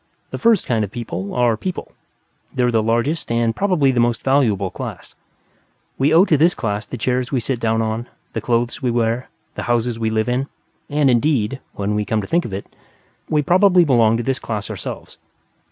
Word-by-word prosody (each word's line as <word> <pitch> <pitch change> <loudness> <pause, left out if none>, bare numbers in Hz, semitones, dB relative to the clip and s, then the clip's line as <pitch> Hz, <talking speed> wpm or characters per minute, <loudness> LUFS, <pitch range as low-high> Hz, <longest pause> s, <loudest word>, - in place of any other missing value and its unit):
The - - -5
first 230 -4 +3
kind 115 -3 +1
of 100 - -3
people 105 -4 -5
are 120 -2 +3
People; 185 - -5 0.6
they 125 - -1
are 125 - +2
the 115 -1 +2
largest 120 +7 0
and 115 -1 +1
probably 180 -8 +2
the 125 - 0
most 120 -1 +1
valuable 110 -9 +2
class. - - -7 0.9
We 140 +3 +3
owe 170 +4 +6
to 160 -6 +3
this 170 +5 +3
class 105 -2 -3
the 125 - -6
chairs 125 +2 -1
we 135 - +1
sit 120 +1 -2
down 115 -1 +1
on, 110 +2 -3 0.3
the - - -3
clothes 120 +1 -1
we 125 - 0
wear, 115 +1 0 0.2
the - - -5
houses 120 -1 0
we 110 -1 0
live 110 +1 0
in; 125 +3 0 0.4
and, 145 -1 +2
indeed 125 -1 +1 0.2
(when 100 +1 -2
we 105 0 0
come 110 +1 -1
to - - -6
think 170 - +1
of 115 - -6
it), 95 +1 -5 0.6
we 150 -1 +2
probably 180 +2 +5
belong 115 -5 +4
to 120 - -2
this 135 0 -1
class 105 -3 -4
ourselves. - - -7
120 Hz, 200 wpm, -20 LUFS, 110-140 Hz, 0.9 s, owe